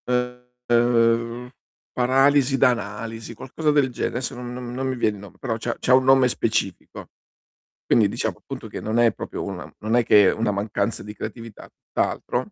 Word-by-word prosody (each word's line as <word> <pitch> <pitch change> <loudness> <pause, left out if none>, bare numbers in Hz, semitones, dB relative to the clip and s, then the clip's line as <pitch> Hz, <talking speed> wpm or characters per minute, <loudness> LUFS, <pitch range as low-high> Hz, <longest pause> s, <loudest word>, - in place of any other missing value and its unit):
Ehm, 125 -1 0 0.4
paralisi 135 +2 +3
da 135 - +5
analisi, 115 0 -4
qualcosa 150 +7 -2
del 145 -3 +3
genere. 120 - -3
Adesso 125 - -4
non 120 0 -7
non 125 -1 -6
non 130 +1 -2
mi 130 - -1
viene 110 -3 0
il - - -12
nome, 100 - -13
però 120 -4 -3
c'ha 120 +1 -3
c'ha 125 - +2
un 130 0 +6
nome 130 -1 +5
specifico. 110 -6 -2 0.8
Quindi 110 -3 +4
diciamo, 100 - -3
appunto - - -8
che - - -7
non 110 +2 -1
è 120 -1 +5
proprio - - -6
una 95 -3 -6
non 110 +2 -1
è 120 - +4
che 105 -3 +6
è - - +1
una 110 -1 0
mancanza 100 +1 -2
di 105 - -8
creatività, 110 +1 -8
tutt'altro, 125 +12 -3
120 Hz, 180 wpm, -23 LUFS, 110-125 Hz, 0.8 s, un